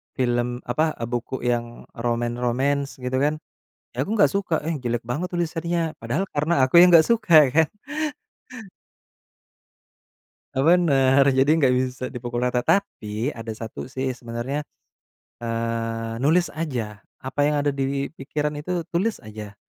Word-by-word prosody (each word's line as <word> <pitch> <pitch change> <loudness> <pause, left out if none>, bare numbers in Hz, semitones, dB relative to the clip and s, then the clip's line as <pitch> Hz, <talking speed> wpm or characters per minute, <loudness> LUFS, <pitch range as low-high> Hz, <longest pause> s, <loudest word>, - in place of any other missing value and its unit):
film, 120 -1 -1
apa, 155 +6 0
e - - -7
buku 120 +2 -4
yang 120 -1 -2
romance-romance, 120 +4 -1
gitu, 125 0 -3
kan, 150 +2 +2 0.6
ya, 125 - -3
aku 200 - -5
enggak 205 - +4
suka, 195 -4 0
"Eh, 165 - 0
jelek 120 -1 -1
banget 140 +10 -3
tulisannya," 170 -1 -1
padahal 120 +11 -1
karena 150 -1 +2
aku 130 - 0
yang 180 - +9
enggak 165 -2 +8
suka, 220 -7 +3 0.2
kan. 160 +2 +4 2.9
E - - -2
benar, 140 -5 +4
jadi 135 +1 +3
enggak 135 -5 +3
bisa 130 0 -1
dipukul 120 0 -3
rata. 125 0 +1
Tapi, 120 - -1
ada 115 -1 -8
satu, 110 +3 -7
sih, 130 0 -2
sebenarnya, 120 +4 -4 0.8
eee, 115 -1 -3
nulis 160 +7 +2
aja 120 -10 -4 0.2
apa 130 +2 -6
yang 150 - +1
ada 145 - +2
di 140 0 -2
pikiran, 150 +2 -2
itu, 175 +3 -2
tulis 195 +6 0
aja. 105 -1 -9
130 Hz, 140 wpm, -23 LUFS, 120-155 Hz, 2.9 s, yang